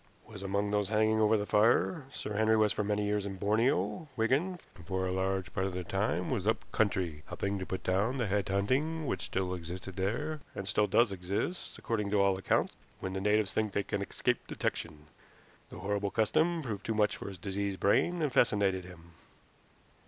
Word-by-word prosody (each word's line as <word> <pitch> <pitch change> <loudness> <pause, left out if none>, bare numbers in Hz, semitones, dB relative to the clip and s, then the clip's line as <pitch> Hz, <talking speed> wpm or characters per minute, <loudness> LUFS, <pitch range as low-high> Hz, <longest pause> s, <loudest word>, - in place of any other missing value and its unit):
"Was 105 -3 -10
among 100 +1 -1
those 105 -1 +1
hanging 110 0 +3
over 110 +1 +4
the 105 - -2
fire. 115 - +3
Sir 105 - -5
Henry 110 +1 +4
was 105 -1 +3
for 105 - -1
many 105 0 0
years 105 0 0
in 95 - -5
Borneo, 115 - +1
Wigan, 145 +11 +1
and 85 -3 -15
for 95 -1 -1
a 95 - -1
large 95 0 -1
part 95 0 0
of 95 - -4
the 90 0 -3
time 95 -1 -1
was 105 -6 -1
up 110 0 +1
country 90 -8 0
helping 100 0 -2
to 95 - -5
put 95 -1 -4
down 100 +8 +1
the 120 - 0
head 100 -1 0
hunting 135 +12 +1
which - - -2
still 95 -1 -2
existed 90 +2 -7
there, 125 +12 -1 0.2
and 100 - -5
still 105 0 +2
does 120 -1 +4
exist, 95 - -3
according 105 -3 -2
to 105 0 +2
all 100 -1 +4
accounts, - - +1 0.3
when 95 - -4
the 95 - -2
natives 105 -1 +2
think 110 -2 0
they 100 - +1
can 100 - -2
escape 100 - -1
detection. 75 0 -3 0.6
The - - -9
horrible 100 +1 -1
custom 160 - +2
proved 105 -6 -4
too 110 - -2
much 105 -1 +2
for - - -7
his 100 -2 -7
diseased 100 +1 -3
brain, 170 - +2
and 145 -4 0
fascinated 100 -5 +3
him. 85 -2 -13
100 Hz, 200 wpm, -31 LUFS, 95-110 Hz, 0.6 s, over